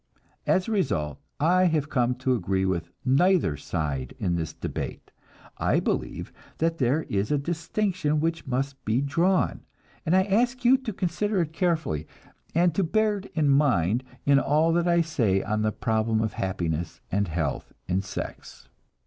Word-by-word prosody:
As 185 Hz, -, +2 dB
a -, -, -2 dB
result 75 Hz, -, 0 dB, 0.2 s
I 180 Hz, +5 st, +4 dB
have 155 Hz, -4 st, +1 dB
come 125 Hz, -1 st, +2 dB
to 130 Hz, 0 st, 0 dB
agree 95 Hz, -4 st, 0 dB
with 85 Hz, -3 st, -1 dB, 0.2 s
neither 145 Hz, -, +3 dB
side 70 Hz, -3 st, -3 dB
in 85 Hz, -, 0 dB
the 80 Hz, -2 st, -2 dB
debate. -, -, -5 dB, 0.5 s
I -, -, +2 dB
believe -, -, -3 dB, 0.2 s
that 165 Hz, +1 st, 0 dB
there 135 Hz, +5 st, +2 dB
is 100 Hz, +4 st, -1 dB
a 145 Hz, -, +3 dB
distinction 165 Hz, +1 st, -1 dB
which 165 Hz, 0 st, -1 dB
must 135 Hz, +1 st, -2 dB
be 110 Hz, +3 st, +1 dB
drawn, 170 Hz, +7 st, +1 dB, 0.4 s
and 175 Hz, +1 st, +2 dB
I 190 Hz, -, +5 dB
ask 240 Hz, +6 st, +1 dB
you 260 Hz, +2 st, +7 dB
to 260 Hz, -4 st, -5 dB
consider 195 Hz, +2 st, -1 dB
it 160 Hz, -1 st, -3 dB
carefully, 160 Hz, -, 0 dB, 0.5 s
and 175 Hz, 0 st, +4 dB, 0.2 s
bear 215 Hz, -1 st, +2 dB
it 195 Hz, -, -11 dB
in 155 Hz, -3 st, +2 dB
mind 125 Hz, -, +3 dB, 0.2 s
in 140 Hz, -1 st, +5 dB
all 155 Hz, +4 st, +2 dB
that 175 Hz, +1 st, +2 dB
I 170 Hz, -1 st, +4 dB
say 115 Hz, -, +1 dB
on 110 Hz, 0 st, -1 dB
the 110 Hz, 0 st, +1 dB
problem 110 Hz, -1 st, 0 dB
of 110 Hz, -2 st, -1 dB
happiness 85 Hz, -3 st, -2 dB
and 100 Hz, +1 st, +1 dB
health 80 Hz, -4 st, -2 dB, 0.2 s
in 90 Hz, +2 st, +1 dB
sex. 95 Hz, -, -7 dB
140 Hz, 165 wpm, -26 LUFS, -, 0.5 s, you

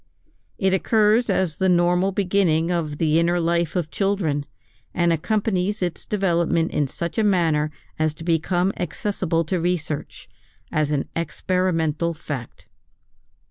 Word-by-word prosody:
It 190 Hz, -2 st, +1 dB
occurs 215 Hz, +4 st, +3 dB
as 185 Hz, -5 st, 0 dB
the 190 Hz, 0 st, +2 dB
normal 180 Hz, +2 st, +3 dB
beginning 180 Hz, -4 st, +1 dB
of 155 Hz, -4 st, -2 dB
the 160 Hz, 0 st, +2 dB
inner 175 Hz, +1 st, +2 dB
life 170 Hz, 0 st, 0 dB
of 170 Hz, -4 st, -1 dB
children, 180 Hz, -8 st, 0 dB, 0.5 s
and 170 Hz, -2 st, +3 dB
accompanies 200 Hz, +2 st, 0 dB
its 175 Hz, -2 st, -4 dB
development 170 Hz, -4 st, +1 dB
in 145 Hz, -, 0 dB
such 170 Hz, -, -4 dB
a -, -, +3 dB
manner 165 Hz, -7 st, +2 dB, 0.3 s
as 155 Hz, -1 st, +1 dB
to 165 Hz, -, -10 dB
become 175 Hz, +3 st, +1 dB
accessible 175 Hz, -1 st, -1 dB
to 175 Hz, +2 st, -1 dB
research, 165 Hz, -4 st, -3 dB, 0.4 s
as 155 Hz, -2 st, +1 dB
an 145 Hz, -2 st, -1 dB
experimental 170 Hz, 0 st, 0 dB
fact. 145 Hz, -6 st, -7 dB
170 Hz, 135 wpm, -23 LUFS, 160-190 Hz, 0.5 s, occurs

